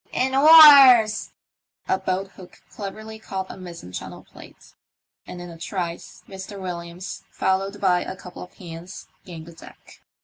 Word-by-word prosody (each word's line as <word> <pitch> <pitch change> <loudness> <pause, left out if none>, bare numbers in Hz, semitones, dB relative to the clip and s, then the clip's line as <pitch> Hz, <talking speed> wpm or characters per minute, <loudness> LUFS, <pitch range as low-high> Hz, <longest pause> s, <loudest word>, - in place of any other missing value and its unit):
" - - -35
In 260 +1 -2
oars! 275 -7 +7 0.3
" - - -47
A - - -7
boat 190 +1 -3
hook 185 -2 -16
cleverly 215 +2 -9
caught 190 -3 -7
a - - -10
mizen 170 - -11
channel - - -9
plate, - - -17 0.5
and 180 - -9
in 175 -1 -10
a 165 - -14
trice 175 -1 -7
Mr. 195 +1 -10
"Williams, 175 0 -8
followed 195 +2 -2
by 180 -3 +1
a - - -7
couple 180 -2 -12
of 180 - -13
hands, 175 +1 -11 0.2
gained 165 -3 -11
the 170 - -14
deck. 165 - -17
190 Hz, 165 wpm, -22 LUFS, 175-210 Hz, 0.5 s, oars